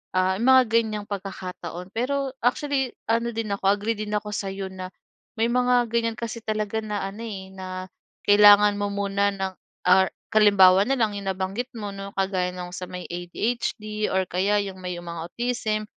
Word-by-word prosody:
ah, 185 0 +2
mga 260 +2 +6
ganyang 220 -2 0
pagkakataon. 185 -2 -6
Pero 270 +3 -1
actually, 270 +1 +1 0.2
ano 230 +1 +1
din 225 -2 -2
ako, 200 - -15
agree 205 +3 0
din 210 0 -5
ako 210 0 -3
sa'yo 195 -1 -4
na 185 -1 -6 0.5
may 225 - +3
mga 245 -1 +3
ganyan 230 0 0
kasi 230 0 -4
talaga 215 0 -1
na 210 -2 -3
ano, 200 +3 -8
eh, 195 -4 -6
na 190 -1 -7 0.6
kailangan 205 0 +7
mo 205 - 0
muna 200 0 0
ng 190 -1 -3 0.3
or 190 +1 +5 0.3
halimbawa 200 -2 +6
na 270 - +2
lang 220 -5 +1
yung 200 -1 -6
nabanggit 190 +6 -2
mo 210 -3 -5
'no, 195 0 -7
kagaya 190 -2 0
ng 180 -1 -6
sa 180 0 -6
may 180 0 -7
ADHD 210 +4 -2
or 190 0 +2
kaya 195 +4 +1
yung 190 -1 -7
may 180 -1 -4
mga 170 -1 -6
autism 235 -2 -1
205 Hz, 175 wpm, -25 LUFS, 190-225 Hz, 0.6 s, kailangan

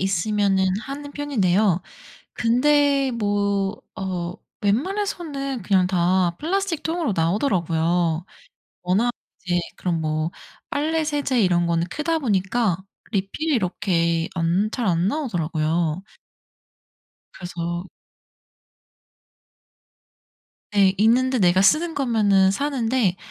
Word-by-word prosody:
있으면은 195 +1 +1
하는 285 +3 -7
편인데요. 205 - +1 0.5
근데 275 +3 +3
뭐 205 -2 0 0.3
어 180 -2 -3 0.3
웬만해서는 280 - -1
그냥 190 -3 +3
다 180 -1 +1
플라스틱 365 0 -1
통으로 325 - -1
나오더라고요. 170 - +1 0.6
워낙 205 +7 +1 0.3
이제 175 -1 +1 0.2
그런 170 -3 -1
뭐 155 +1 -1 0.4
빨래 315 +2 0
세제 290 -4 0
이런 175 -3 +2
거는 170 0 0
크다 325 +2 -1
보니까 205 - +1 0.4
리필이 205 +11 -1
이렇게 170 -5 0
안 175 +5 +1
잘 235 -1 -2
안 175 +1 +2
나오더라고요. 170 - -1 1.3
그래서 175 0 -5 2.8
네, 195 -2 +4
있는데 255 +4 +3
내가 185 -1 +4
쓰는 320 - +3
거면은 210 -7 +3
사는데 240 -5 0
200 Hz, 225 characters per minute, -23 LUFS, 175-270 Hz, 2.8 s, 네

